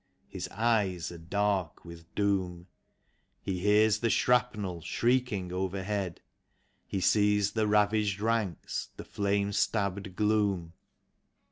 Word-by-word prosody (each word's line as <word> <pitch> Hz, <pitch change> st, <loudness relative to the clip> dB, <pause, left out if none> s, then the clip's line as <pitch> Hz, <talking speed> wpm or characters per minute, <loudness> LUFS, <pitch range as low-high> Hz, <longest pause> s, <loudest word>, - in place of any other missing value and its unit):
His -, -, -6 dB
eyes 105 Hz, -7 st, 0 dB
are 85 Hz, -, -9 dB
dark 95 Hz, -1 st, -1 dB
with 85 Hz, -1 st, -12 dB
doom; 95 Hz, -4 st, 0 dB, 0.7 s
He 95 Hz, -2 st, -3 dB
hears 105 Hz, +2 st, +4 dB
the 115 Hz, -, +1 dB
shrapnel 110 Hz, -9 st, +1 dB
shrieking 115 Hz, -2 st, 0 dB
overhead; 95 Hz, 0 st, -3 dB, 0.7 s
He 100 Hz, -, -2 dB
sees 105 Hz, +1 st, +3 dB
the 110 Hz, 0 st, 0 dB
ravaged 105 Hz, -1 st, +2 dB
ranks, 110 Hz, -4 st, -2 dB
the -, -, -8 dB
flame 100 Hz, 0 st, 0 dB
stabbed 100 Hz, -2 st, -1 dB
gloom. 100 Hz, -5 st, +1 dB
100 Hz, 110 wpm, -29 LUFS, 90-105 Hz, 0.7 s, hears